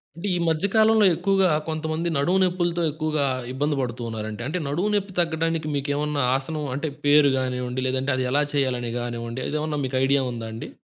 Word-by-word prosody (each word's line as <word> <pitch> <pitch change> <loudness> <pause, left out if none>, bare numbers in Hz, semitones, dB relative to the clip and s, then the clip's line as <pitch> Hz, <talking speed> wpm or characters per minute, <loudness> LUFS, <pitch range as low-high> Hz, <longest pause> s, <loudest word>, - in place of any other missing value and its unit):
అంటే 170 +5 -5
ఈ - - +1
మధ్యకాలంలో 210 +6 +3
ఎక్కువగా 195 +1 +2 0.2
కొంతమంది 160 +1 -2
నడుము 175 +7 +2
నొప్పులతో 175 -1 0
ఎక్కువగా 155 -1 -1 0.3
ఇబ్బంది 145 +3 0
పడుతున్నారండి. 115 -3 -4
అంటే 160 +4 -2
నడుము 175 +9 0
నొప్పి 200 -1 -1
తగ్గడానికి 165 -1 0
మీకేమన్నా 145 +1 -1
ఆసనం 150 +3 -3
అంటే 150 +3 -2 0.2
పేరు 145 -1 +6
గానివ్వండి, 125 -1 -2
లేదంటే 130 +2 0
అది 130 0 -1
ఎలా 145 +2 +3
చేయాలి 125 -4 0
గానివ్వండి, 120 +1 -4
అదేమన్నా 150 0 -2
మీకు 130 0 -2
ఐడియా 140 +1 +3
ఉందా 115 -2 -5
అండి? 115 - -7
150 Hz, 160 wpm, -24 LUFS, 130-165 Hz, 0.3 s, పేరు